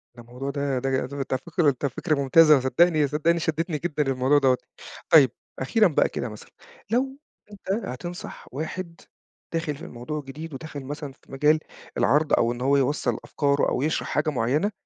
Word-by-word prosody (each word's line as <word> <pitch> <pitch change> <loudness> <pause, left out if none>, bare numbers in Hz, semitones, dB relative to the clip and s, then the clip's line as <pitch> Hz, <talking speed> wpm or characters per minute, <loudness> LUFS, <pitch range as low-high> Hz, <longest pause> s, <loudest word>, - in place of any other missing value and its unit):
ده 120 - -11
الموضوع 125 +4 -6
ده 140 -2 -1
ده 135 +2 -2 0.2
ده 135 0 -3
فكرة 155 0 +1
ده 140 - +2
فكرة 155 +5 -1
ممتازة 150 +2 +6
صدّقني 150 +4 +3
صدّقني 155 +4 +1
شدّتني 160 0 -1
جدًا 150 -1 -1
للموضوع 135 +1 +2
دَوّة. 130 -2 +3 0.5
طيب 140 -7 +7 0.3
أخيرًا 210 - +3
بقى 160 - +2
كده، 120 - -4
مثلًا 105 0 -12 0.4
لو 265 +4 0 0.3
أنت 200 +1 -3
هتنصح 175 +7 -7
واحد 165 +4 -6 0.5
داخِل 165 -3 -1
في - - -10
الموضوع 125 +6 -5
جديد 150 +3 -9
وداخل 145 0 -7
مثلًا 145 0 -6
في - - -23
مجال 150 +3 +3 0.4
العرْض 150 +3 +2
أو 115 - +3
إن 120 0 -6
هو 140 +2 +3
يوصّل 140 +2 0
أفكاره 140 -1 +1
أو - - -1
يِشرَح 155 +3 -1
حاجة 155 +1 0
معيّنة، 145 - 0
145 Hz, 170 wpm, -25 LUFS, 135-160 Hz, 0.5 s, طيب